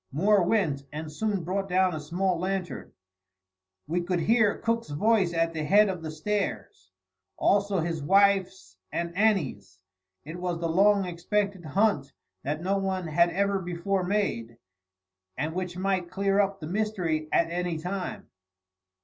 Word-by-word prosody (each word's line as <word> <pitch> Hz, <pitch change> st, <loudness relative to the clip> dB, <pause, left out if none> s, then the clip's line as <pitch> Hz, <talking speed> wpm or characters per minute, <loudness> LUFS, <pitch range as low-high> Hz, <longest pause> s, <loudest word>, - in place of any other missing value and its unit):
Moore 195 Hz, +8 st, +3 dB
went, 170 Hz, -8 st, +1 dB
and 155 Hz, +1 st, -6 dB
soon 200 Hz, +2 st, -1 dB
brought 195 Hz, +3 st, -2 dB
down 185 Hz, 0 st, +3 dB
a 155 Hz, -, -3 dB
small 175 Hz, +4 st, -1 dB
lantern. 185 Hz, 0 st, -3 dB, 0.9 s
We 170 Hz, +4 st, -1 dB
could 175 Hz, 0 st, -1 dB
hear 220 Hz, +2 st, +3 dB
Cook's 230 Hz, -6 st, -1 dB
voice 195 Hz, +4 st, +2 dB
at 165 Hz, 0 st, 0 dB
the 155 Hz, -1 st, -3 dB
head 205 Hz, +6 st, +5 dB
of 185 Hz, -3 st, -4 dB
the 160 Hz, -, -5 dB
stairs; 155 Hz, -, -3 dB, 0.5 s
also 200 Hz, -2 st, +2 dB
his 165 Hz, -1 st, -2 dB
wife's 190 Hz, -, +2 dB
and 170 Hz, 0 st, -3 dB
Annie's. 150 Hz, -, 0 dB, 0.5 s
It 160 Hz, +3 st, -7 dB
was 180 Hz, -1 st, -2 dB
the 165 Hz, -, -1 dB
long 200 Hz, +3 st, +4 dB
expected 190 Hz, +1 st, -2 dB
hunt 150 Hz, -4 st, +1 dB, 0.3 s
that 150 Hz, +4 st, -3 dB
no 195 Hz, +2 st, +1 dB
one 190 Hz, -2 st, -2 dB
had 170 Hz, +3 st, +4 dB
ever 200 Hz, +2 st, 0 dB
before 180 Hz, +2 st, -2 dB
made, 180 Hz, -, -1 dB, 0.8 s
and 150 Hz, +4 st, -2 dB
which 180 Hz, 0 st, -4 dB
might 185 Hz, -2 st, -1 dB
clear 195 Hz, +1 st, +1 dB
up 195 Hz, -1 st, +1 dB
the 155 Hz, -, -7 dB
mystery 180 Hz, -6 st, -1 dB
at 170 Hz, 0 st, +2 dB
any 175 Hz, -1 st, -2 dB
time. 180 Hz, +3 st, -5 dB
180 Hz, 150 wpm, -27 LUFS, 160-200 Hz, 0.9 s, head